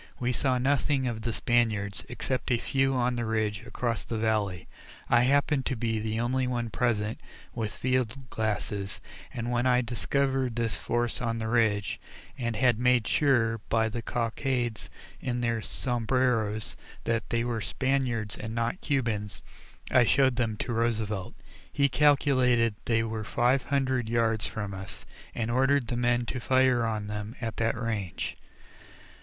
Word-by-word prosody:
We 125 0 0
saw 130 +1 +1
nothing 135 +1 +1
of 115 -3 -2
the 115 +1 -2
Spaniards, 110 -4 +1
except 130 +2 -2
a 120 - +3
few 135 +2 +1
on 125 0 +1
the 120 - -1
ridge 110 -1 -1
across 115 -3 -2
the 115 - -4
valley. 105 -5 0 0.4
I 120 - +5
happened 140 +1 +2
to 130 - 0
be 115 -1 -1
the 110 +1 -2
only 125 +2 0
one 120 -2 -2
present 110 -3 0 0.3
with 110 -3 -4
field 130 0 -1
glasses, 105 -2 -2 0.3
and 120 0 -3
when 120 +1 +1
I 125 0 +4
discovered 130 +1 0
this 115 -2 -1
force 120 -1 -1
on 115 -1 -1
the 110 -1 -3
ridge, 110 -3 +1 0.3
and 115 -3 -2
had 120 -1 +3
made 125 -2 +3
sure, 120 -6 +2
by 110 -1 +2
the 115 +2 -4
cockades 120 +1 -2 0.3
in 120 -1 -2
their 115 -2 0
sombreros, 115 -3 0 0.3
that 115 -1 -1
they 115 0 +1
were 120 -2 -2
Spaniards 125 -4 -1
and 110 +1 -6
not 115 +9 -1
Cubans, 110 -8 -1 0.5
I 130 - +6
showed 130 +1 +3
them 115 -3 -1
to 120 - -3
Roosevelt. 110 -4 -1 0.4
He 140 -1 +2
calculated 130 -5 +3
they 115 -1 +2
were 110 -1 -3
five 120 +4 +2
hundred 130 -4 0
yards 115 -2 +2
from 105 -3 -4
us, 95 -1 -8 0.3
and 115 0 -1
ordered 135 0 +2
the 120 - -1
men 120 0 +1
to 125 - -3
fire 130 -1 +3
on 110 -2 -2
them 105 +2 -5
at 115 -3 -4
that 115 0 0
range. 110 -7 -3
120 Hz, 160 wpm, -28 LUFS, 110-125 Hz, 0.5 s, I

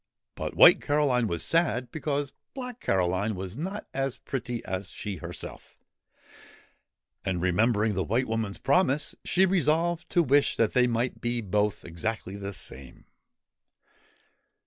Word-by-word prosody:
But - - -5
White - - +8
Caroline 140 -5 +2
was 85 -3 -2
sad 130 -8 +1
because 145 -2 -2 0.2
Black 250 -2 -6
Caroline 95 +3 0
was 95 +1 -6
not 190 - -4
as 135 -1 -2
pretty 120 -3 -4
as 95 0 -3
she 100 -3 -5
herself, - - -7 1.5
and, 95 -2 -1
remembering 105 +4 +2
the 95 -1 0
White 120 +7 0
Woman's 110 -3 -2
promise, 150 -1 +2
she 190 +1 +3
resolved 170 -1 +1
to 175 - +3
wish 145 0 +3
that 115 - +2
they 125 -1 +4
might 120 +1 -1
both 105 -4 0
be - - -10
exactly 95 +3 -3
the 100 0 -5
same. 70 -8 -10
120 Hz, 135 wpm, -27 LUFS, 100-145 Hz, 1.5 s, White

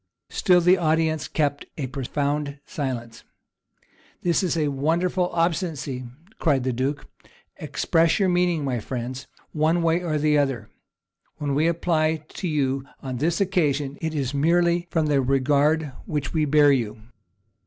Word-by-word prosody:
Still 180 -2 +4
the 180 +2 +4
audience 160 -1 +1
kept 145 -2 -1
a 145 - -2
profound 140 +2 -2
silence. 125 -8 -5 1.0
"This 175 -1 +2
is 175 -3 0
wonderful 170 +6 0
obstinacy," 160 -6 -1 0.3
cried 140 -6 +2
the 130 0 -1
duke: 135 +4 -2 0.5
"express 165 0 +1
your 195 - +3
meaning, 175 -4 +1
my 125 -3 -1
friends, 125 +3 -5 0.2
one 160 +2 +1
way 165 +1 +2
or 165 -3 -2
other: 145 -7 +1 0.7
when 145 -2 -2
we 150 +4 +2
apply 160 -2 +1
to 185 - -5
you 135 -4 0 0.2
on 130 -2 -4
this 160 +6 0
occasion, 150 -8 0
it 160 -1 -2
is 135 -2 -2
merely 170 +4 +2
from 160 -1 +1
the 145 -2 +2
regard 140 +3 +2 0.2
which 150 -3 -3
we 155 -2 +2
bear 150 0 +5
to 140 - +5
you. 110 -2 -5
150 Hz, 145 wpm, -24 LUFS, 135-165 Hz, 1.0 s, bear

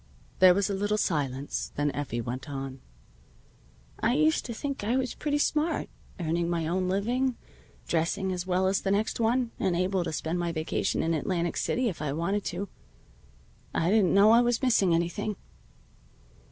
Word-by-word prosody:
There 185 -1 +8
was 200 0 +1
a 205 - -2
little 205 +2 0
silence. 140 -7 -2
Then 145 0 +1
Effie 135 -5 -3
went 125 +4 -5
on. 135 -1 -6 1.2
"I 245 - +2
used 310 +2 +2
to 240 - -5
think 280 -1 -4
I 235 +5 +1
was 260 -2 -1
pretty 295 -1 -1
smart, 305 +2 0 0.3
earning 170 0 0
my 170 -2 -1
own 185 +3 0
good - - -1
living, 245 +6 0 0.5
dressing 180 +4 0
as 180 0 -3
well 185 +1 +2
as 190 +1 +2
the 195 - -1
next 205 +4 0
one, 235 +1 +1
and 180 - +1
able 185 +1 +1
to 170 - -3
spend 160 +3 -2
my 170 -1 -1
vacation 160 -1 -1
in 165 - +1
Atlantic 170 +2 -1
City 250 0 0
if 185 -8 -4
I 145 -2 -1
wanted 185 +6 -1
to. 185 +4 -3 1.1
I 165 +3 +2
didn't 200 -4 +4
know 205 +2 +7
I 235 +1 +7
was 240 +2 +1
missing 200 -9 +4
anything. 175 +5 -1
185 Hz, 180 wpm, -28 LUFS, 165-220 Hz, 1.2 s, There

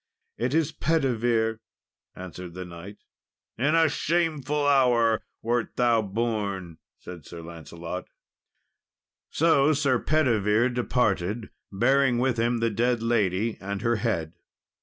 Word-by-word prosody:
"It 125 +5 -1
is 160 -3 +2
Pedivere," 120 -7 0 0.6
answered 90 -1 -9
the 90 0 -6
knight. 90 +4 -10 0.6
"In 145 +7 +1
a 165 -1 +5
shameful 150 -2 0
hour 120 -5 +3 0.2
wert 120 0 -1
thou 120 -2 +3
born," 100 -5 -3 0.2
said 90 -4 -10
Sir 85 +3 -10
Lancelot. 85 +2 -7 1.2
So 155 -2 +3
Sir 140 -4 +1
Pedivere 120 -6 +2
departed, 115 -4 -1 0.2
bearing 130 +4 +3
with 125 -1 0
him 120 0 +1
the 115 0 +1
dead 120 +2 0
lady 110 -2 0
and 100 +1 -4
her 120 -1 +2
head. 90 -7 -2
115 Hz, 115 wpm, -26 LUFS, 100-130 Hz, 1.2 s, a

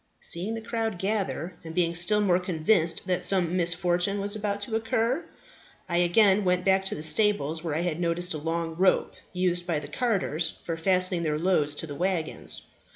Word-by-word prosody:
Seeing 190 +7 -1
the 225 - -6
crowd 225 -3 -3
gather, 190 -3 -2
and 160 0 -9
being 170 -2 +1
still 180 +5 +4
more 185 -3 +2
convinced 175 0 +1
that 180 -1 0
some 180 -3 +2
misfortune 175 +2 0
was 200 +1 -2
about 205 -1 -3
to 220 +2 -3
occur, 225 +6 0 0.6
I 175 0 +1
again 195 +3 +4
went 180 -1 +1
back 190 0 +3
to - - +1
the 150 - -7
stables, 160 -2 +2
where 160 -3 -3
I 160 - 0
had 175 -2 -2
noticed 175 +1 0
a 155 - -4
long 165 +1 -3
rope 185 +2 +2 0.2
used 180 -1 -1
by 165 -3 0
the 145 - -8
carters 170 - -1
for 165 - -3
fastening 185 +1 +1
their 155 -2 -1
loads 155 -4 +1
to 165 - -4
the 150 - -7
waggons. 175 0 -1
180 Hz, 190 wpm, -26 LUFS, 165-200 Hz, 0.6 s, still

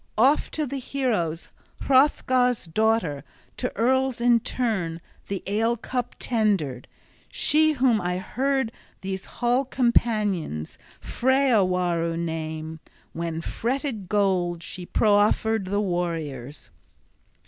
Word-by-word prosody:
Oft 265 +7 +3
to 310 - 0
the 275 0 -4
heroes 220 - -2 0.3
Hrothgar's 255 -3 +3
daughter, 180 -5 0 0.3
to 250 - -2
earls 260 +1 +2
in 240 0 +4
turn, 205 -9 -2 0.3
the 195 -2 -4
ale 225 +4 +1
cup 245 +1 -4
tendered, 195 - 0 0.4
she 310 +1 +3
whom 250 -6 +2
I 180 0 -1
heard 265 +5 -1 0.3
these 190 0 -4
hall 245 +2 0
companions 215 - 0 0.2
Freawaru 185 -11 +1
name, 160 -1 -4 0.3
when 165 -1 -3
fretted 235 - -3
gold 180 -4 +1
she 175 +1 -7
proffered 215 0 +2
the 205 +2 0
warriors. 160 -8 -3
210 Hz, 105 wpm, -25 LUFS, 170-250 Hz, 0.4 s, in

